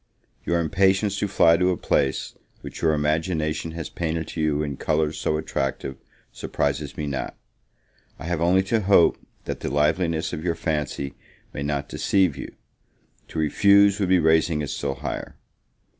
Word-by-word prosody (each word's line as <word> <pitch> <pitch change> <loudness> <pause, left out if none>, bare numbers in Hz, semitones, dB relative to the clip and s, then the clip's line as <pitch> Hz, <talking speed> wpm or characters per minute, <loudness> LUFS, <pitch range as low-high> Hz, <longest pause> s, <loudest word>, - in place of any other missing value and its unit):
Your 85 0 +1
impatience 95 +4 +2
to 105 - 0
fly 85 -3 +4
to 90 0 +2
a 90 - 0
place 70 - 0 0.3
which - - -9
your 80 -2 +3
imagination 80 +1 -1
has 80 -3 -5
painted 80 -1 -3
to 80 - -4
you 75 -1 +1
in 70 -3 -4
colors 75 0 0
so 75 - 0
attractive, 70 -3 -3 0.4
surprises 70 0 -2
me 75 - -2
not; 70 -2 -4 0.8
I 75 - -9
have 85 -1 -2
only 90 +3 +4
to 110 +4 +1
hope, 95 -3 +4 0.3
that - - -4
the - - -3
liveliness 80 +3 +1
of 75 - -4
your 85 -2 0
fancy 75 -4 -3 0.4
may 70 - -5
not 70 0 -2
deceive 95 -4 +1
you: 65 - -8 0.7
to - - -9
refuse, 100 +6 +4
would 95 -3 0
be 95 - +5
raising 80 -1 +2
it 70 - -4
still 70 -1 -3
higher. 70 +2 -5
80 Hz, 165 wpm, -24 LUFS, 75-90 Hz, 0.8 s, be